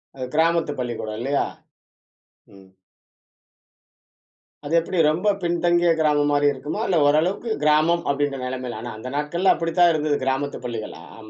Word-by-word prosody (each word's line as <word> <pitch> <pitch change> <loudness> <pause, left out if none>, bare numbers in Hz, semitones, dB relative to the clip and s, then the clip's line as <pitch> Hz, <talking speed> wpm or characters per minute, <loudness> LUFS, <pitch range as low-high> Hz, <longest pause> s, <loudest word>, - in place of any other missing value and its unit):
அது 130 - -5
கிராமத்து 165 -2 +2
பள்ளிக்கூடம் 110 -3 -4
இல்லயா? 140 +4 0 1.1
ம். 95 -1 -17 2.0
அது 155 - -4
எப்பிடி 170 +1 -1
ரொம்ப 180 +7 +2
பின்தங்கிய 175 0 +2
கிராமம் 145 -1 +2
மாரி 145 0 +3
இருக்குமா? 145 +9 -5
இல்ல 175 -4 +2
ஓரளவுக்கு 175 +10 +1
கிராமம் 155 +3 +3
அப்பிடின்ற 140 -1 -1
நிலைமையில. 125 -3 -5
ஆனா, 120 -1 -6
அந்த 130 - -7
நாட்கள்ல 170 +6 +2
அப்பிடி 165 -1 -3
தான் 175 -1 +6
இருந்தது 150 -1 0
கிராமத்து 135 +2 -2
பள்ளிகள்! 115 -3 -5 0.2
ஆம 110 -1 -13
150 Hz, 140 wpm, -22 LUFS, 130-170 Hz, 2.0 s, தான்